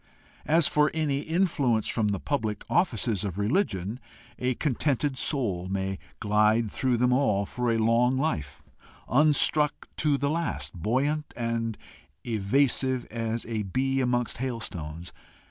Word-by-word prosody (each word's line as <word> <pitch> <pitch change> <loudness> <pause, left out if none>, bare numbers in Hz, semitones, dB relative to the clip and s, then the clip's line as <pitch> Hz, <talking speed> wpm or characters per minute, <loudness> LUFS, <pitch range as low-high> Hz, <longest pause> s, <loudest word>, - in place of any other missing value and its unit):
As 160 0 +5
for 150 0 +3
any 150 -3 0
influence 150 - +1
from 110 -3 0
the 100 -2 -1
public 110 -7 -2
offices 115 - +1
of 95 -3 -4
religion, 105 - 0 0.4
a 125 0 0
contented 145 0 0
soul 110 - 0
may 95 0 -2 0.2
glide 105 +1 +2
through 130 -2 0
them 125 +1 +3
all 105 -7 +2
for 125 +3 -1
a 115 - +1
long 115 +3 +3
life, 75 - -2 0.4
unstruck 150 +2 +3
to 150 -2 +2
the 140 +1 0
last, 165 +1 -2
buoyant 135 - -1
and 115 -2 -2 0.5
evasive 125 +3 +1
as 115 0 -3
a 110 -2 -2
bee 135 +7 0
amongst 120 -2 0
hailstones. 90 -10 -5
120 Hz, 130 wpm, -27 LUFS, 105-140 Hz, 0.5 s, As